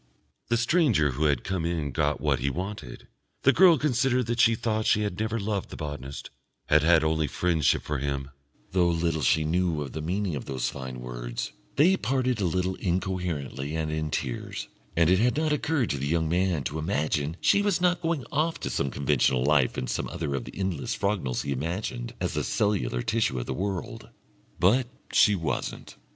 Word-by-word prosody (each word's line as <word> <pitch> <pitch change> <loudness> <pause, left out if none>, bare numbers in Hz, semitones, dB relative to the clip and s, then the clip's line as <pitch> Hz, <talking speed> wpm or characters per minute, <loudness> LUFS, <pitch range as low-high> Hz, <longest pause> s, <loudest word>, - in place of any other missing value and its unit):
The 120 - +2
stranger 120 - +3
who 70 +5 -1
had 70 -2 +2
come 95 -4 -2
in 80 -4 -1
got - - 0
what - - +1
he 70 +3 0
wanted; 90 -3 -6 0.4
the 140 - +6
girl 175 -2 +7
considered 130 -2 +1
that 120 +1 -2
she 115 0 +5
thought 110 -1 -1
she 105 - +4
had 100 -3 -3
never 110 +1 -1
loved 100 -1 -2
the - - -8
botanist, 75 -3 -6 0.3
had 75 0 +4
had 80 0 +5
only 80 -1 +1
friendship 80 -2 +1
for 75 -2 -2
him 70 0 -3 0.4
though 90 -2 +3
little 85 -1 0
she 80 +4 +3
knew 85 -1 0
of 70 - -8
the 80 - -5
meaning 90 +1 -1
of - - -5
those 65 -3 -2
fine 65 -2 -7
words - - -5 0.2
they 170 +8 +5
parted 130 - 0
a - - +1
little 90 +2 0
incoherently 85 -6 -2
and 80 -1 -1
in 80 0 -2
tears, 70 -4 -4 0.3
and 85 -1 +5
it 90 +2 +4
had 125 +5 +2
not 155 -1 +1
occurred 150 -4 0
to 70 - -2
the 70 - -2
young 80 +1 +1
man 90 -2 +1
to 75 +3 -3
imagine 75 -1 -1
she 200 - +4
was 205 -3 +1
not 180 0 +2
going 165 -7 -1
off 160 +3 0
to 70 - -1
conventional 65 -2 +1
life 70 -3 +3
in 65 - -1
some - - -2
other 80 -5 -3
of 70 -3 -3
the - - -10
endless 95 -7 -2
Frognals 100 -11 -1
he - - -3
imagined 75 - -3
as - - -2
the - - -1
cellular 60 -13 0
tissue 110 - 0
of - - -3
the - - -3
world. 95 -1 -4 0.5
But 115 +9 +4 0.3
she 105 -2 +5
wasn't. 80 -4 -4
85 Hz, 195 wpm, -27 LUFS, 70-110 Hz, 0.5 s, girl